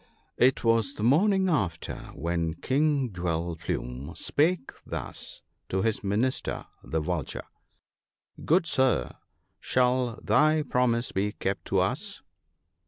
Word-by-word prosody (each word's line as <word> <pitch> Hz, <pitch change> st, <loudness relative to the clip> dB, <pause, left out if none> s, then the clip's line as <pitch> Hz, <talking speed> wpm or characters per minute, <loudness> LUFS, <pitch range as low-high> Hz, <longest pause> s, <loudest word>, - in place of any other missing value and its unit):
It 130 Hz, +2 st, +4 dB
was 115 Hz, +4 st, +2 dB
the 105 Hz, -, -4 dB
morning 190 Hz, -, +4 dB
after, 95 Hz, -, -1 dB, 0.2 s
when 85 Hz, +1 st, -1 dB
King 135 Hz, -, +1 dB
Jewel 85 Hz, -1 st, -2 dB
plume 65 Hz, 0 st, -4 dB
spake 160 Hz, -1 st, +1 dB
thus -, -, -7 dB, 0.3 s
to 95 Hz, 0 st, 0 dB
his 110 Hz, -2 st, 0 dB
Minister 110 Hz, +6 st, -1 dB, 0.2 s
the 80 Hz, -, -1 dB
Vulture 80 Hz, -2 st, -3 dB, 0.3 s
— -, -, -63 dB
" -, -, -17 dB
Good 170 Hz, +2 st, +4 dB
sir, 130 Hz, -, +2 dB, 0.5 s
shall 125 Hz, -1 st, +1 dB
thy 155 Hz, 0 st, +4 dB
promise 125 Hz, -3 st, +1 dB
be 105 Hz, +2 st, -1 dB
kept 95 Hz, -2 st, -3 dB
to -, -, +2 dB
us -, -, -2 dB
115 Hz, 125 wpm, -28 LUFS, 85-135 Hz, 0.5 s, It